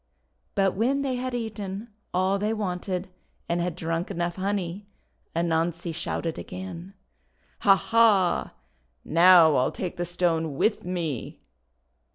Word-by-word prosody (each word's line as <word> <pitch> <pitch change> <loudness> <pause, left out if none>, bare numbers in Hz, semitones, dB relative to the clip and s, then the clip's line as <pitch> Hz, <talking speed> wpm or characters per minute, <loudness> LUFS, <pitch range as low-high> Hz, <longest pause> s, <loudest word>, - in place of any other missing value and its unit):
But 195 -2 +3
when 265 +7 +1
they 270 -2 -1
had 255 0 -3
eaten 215 -2 -5 0.2
all 190 +2 +1
they 215 +2 0
wanted, 185 -2 -3 0.4
and 170 0 0
had 175 -1 -2
drunk 165 0 -2
enough 175 -2 -2
honey, 195 0 -2 0.5
Anansi 170 0 0
shouted 165 0 -3
again: 185 +1 -8 0.3
— - - -43 0.3
"Ha! 195 -1 +6
ha! 210 -4 +3 0.5
Now 170 -2 +7
I'll 130 - +2
take 180 -2 -5
the 175 - -1
Stone 165 -3 0
with 215 - +1
me!" 170 -8 -4
180 Hz, 130 wpm, -26 LUFS, 170-200 Hz, 0.5 s, Now